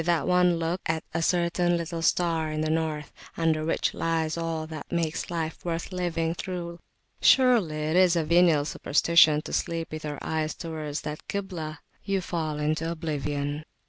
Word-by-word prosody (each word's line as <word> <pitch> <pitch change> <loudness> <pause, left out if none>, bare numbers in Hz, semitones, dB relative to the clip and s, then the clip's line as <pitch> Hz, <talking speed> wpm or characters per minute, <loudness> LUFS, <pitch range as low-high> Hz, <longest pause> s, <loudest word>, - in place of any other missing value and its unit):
And - - -9 0.2
with - - -2
one 180 -1 +4
look 165 +3 -2
at 160 0 -1
a - - 0
certain 175 0 +2
little 170 0 -4
Star 165 -2 +1
in 155 0 -2
the 155 0 0
north, 155 -2 -2 0.3
under 160 -2 +1
which 160 - 0
lies 160 -1 -1
all 165 -1 -2
that 155 -2 -8
makes 165 -2 -1
life 165 -2 -3
worth 170 +1 -3
living 165 -3 -1
through 175 -1 -5 0.4
surely 240 - +5
it 155 +2 0
is 180 -1 +5
a 165 - +2
venial 165 -2 +4
superstition 155 0 +4
to - - -7
sleep 165 -1 -2
with 155 0 -6
your 150 -1 -4
eyes 155 -1 -1
towards 155 -3 -5
that 150 0 -6
Kiblah! 175 -6 -4 0.3
you 195 -1 0
fall 160 -4 -3
into 155 +2 -1
oblivion. 150 -2 -3
165 Hz, 175 wpm, -27 LUFS, 155-170 Hz, 0.4 s, surely